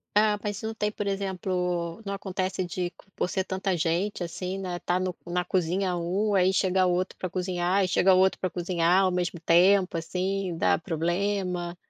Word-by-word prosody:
Ah, 210 0 +4
mas 205 0 -3
não 220 0 -3
tem, 210 -1 -1
por 210 - -4
exemplo, 180 -2 -2
não 200 - -3
acontece 190 -1 -2
de 175 0 -3 0.2
por - - -1
ser 190 - 0
tanta 190 -1 -2
gente 175 +4 0
assim, 180 +2 -4
né, 180 -2 -4
tá 180 +1 0
no 185 -1 -2
na 175 +1 -1
cozinha 180 +1 0
um, 190 +5 0
aí 190 -1 +4
chega 190 -1 +2
outro 180 +1 0
pra 185 - -4
cozinhar 185 +1 0
e - - +1
chega 185 +1 +4
outro 190 +1 +3
pra 185 - -1
cozinhar 175 +1 +2
ao 185 - +2
mesmo 175 -1 -2
tempo, 180 +3 +4
assim, 185 +1 -2
dá 90 - +3
problema? 175 - -1
185 Hz, 180 wpm, -27 LUFS, 175-195 Hz, 0.2 s, Ah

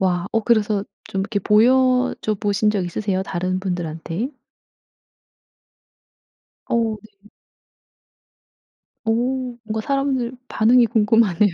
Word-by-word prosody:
와. 180 -1 0
어 225 - +2
그래서 215 -3 +1 0.2
좀 195 - -3
이렇게 200 +1 -1
보여줘 250 +2 +3
보신 205 0 0
적 200 -3 -1
있으세요? 190 +2 -2
다른 185 0 -2
분들한테? 175 - -3 2.4
어. 230 -2 0
네. 210 -1 -20 1.8
어. 225 - +2 0.5
뭔가 220 0 -3
사람들 270 -2 -1
반응이 235 +2 +4
궁금하네요. 210 -3 +3
215 Hz, 215 characters per minute, -21 LUFS, 190-230 Hz, 2.4 s, 반응이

